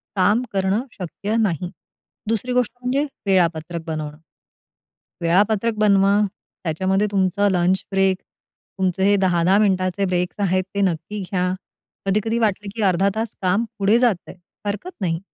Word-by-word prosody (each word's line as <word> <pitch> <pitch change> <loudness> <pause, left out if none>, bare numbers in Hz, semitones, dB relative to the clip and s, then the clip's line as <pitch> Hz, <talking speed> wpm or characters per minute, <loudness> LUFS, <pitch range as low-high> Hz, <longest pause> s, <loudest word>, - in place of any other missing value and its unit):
काम 205 +5 +3
करणं 195 +3 +1
शक्य 200 +4 -4
नाही. 180 -4 0 0.6
दुसरी 225 +3 -1
गोष्ट 250 -2 +2
म्हणजे 260 +3 +1 0.2
वेळापत्रक 170 -3 +1
बनवणं. 155 -2 -4 1.0
वेळापत्रक 205 +6 +2
बनवा, 200 -1 +4 0.4
त्याच्यामध्ये 190 +5 +1
तुमचा 200 +1 +2
लंच 185 +1 +2
ब्रेक, 195 -1 +2 0.6
तुमचे 190 0 +1
हे 205 - +5
10-10 180 +1 +3
मिनिटांचे 190 -1 +1
ब्रेक 180 -1 -1
आहेत 185 -1 +2
ते 200 - +1
नक्की 190 +3 -1
घ्या. 180 -1 +1 0.5
कधी-कधी 215 +4 +1
वाटलं, 210 -2 0
की 225 - -3
अर्धा 190 +1 +3
तास 220 0 -3
काम 190 +5 +2
पुढे 205 +4 +4
जातंय. 215 -7 0 0.3
हरकत 205 - -3
नाही. 165 -3 0
195 Hz, 135 wpm, -22 LUFS, 180-210 Hz, 1.0 s, हे